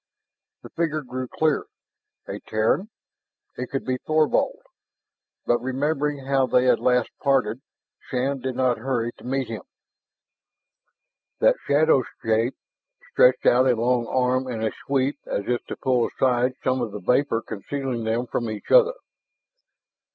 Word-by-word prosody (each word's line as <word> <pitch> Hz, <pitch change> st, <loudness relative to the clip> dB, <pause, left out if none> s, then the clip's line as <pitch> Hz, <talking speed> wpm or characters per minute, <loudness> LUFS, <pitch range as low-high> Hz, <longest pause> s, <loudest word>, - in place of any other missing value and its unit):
The -, -, -11 dB
figure 155 Hz, -2 st, -1 dB
grew 130 Hz, 0 st, -5 dB
clearer. 155 Hz, +2 st, 0 dB, 0.6 s
A -, -, -5 dB
Terran! 110 Hz, -, 0 dB, 0.7 s
It 125 Hz, -, -4 dB
could 135 Hz, -, -3 dB
be 130 Hz, -1 st, -1 dB
Thorvald! 155 Hz, +1 st, +1 dB, 0.9 s
But 120 Hz, -, +2 dB
remembering 140 Hz, +2 st, -1 dB
how 135 Hz, -1 st, +2 dB
they 125 Hz, -, +3 dB
had 130 Hz, -, +4 dB
last 125 Hz, -2 st, +2 dB
parted, 130 Hz, -4 st, +1 dB, 0.5 s
Shann 135 Hz, +1 st, -1 dB
did 130 Hz, 0 st, -4 dB
not 125 Hz, -2 st, +1 dB
hurry 120 Hz, -1 st, -1 dB
to -, -, -15 dB
meet 135 Hz, 0 st, -2 dB
him. 110 Hz, -4 st, -5 dB, 1.8 s
That -, -, +4 dB
shadow 145 Hz, -1 st, +4 dB, 0.2 s
shape 115 Hz, +3 st, +1 dB, 0.6 s
stretched -, -, +4 dB
out 125 Hz, +2 st, +5 dB
a 125 Hz, -, +4 dB
long 120 Hz, +1 st, +1 dB
arm 130 Hz, +1 st, +1 dB
in 115 Hz, -3 st, -4 dB
a 110 Hz, -, 0 dB, 0.2 s
sweep 140 Hz, +1 st, 0 dB
as 100 Hz, -, -2 dB
if 125 Hz, -1 st, -1 dB
to -, -, -6 dB
pull 125 Hz, -2 st, +1 dB
aside 125 Hz, -1 st, +1 dB
some 130 Hz, 0 st, +1 dB
of 115 Hz, -4 st, -3 dB
the 105 Hz, -, -5 dB
vapor 115 Hz, +3 st, +1 dB
concealing 125 Hz, +3 st, -4 dB
them 115 Hz, +2 st, 0 dB
from 120 Hz, -1 st, -3 dB
each 110 Hz, -1 st, -7 dB
other. -, -, +6 dB
130 Hz, 145 wpm, -24 LUFS, 120-135 Hz, 1.8 s, other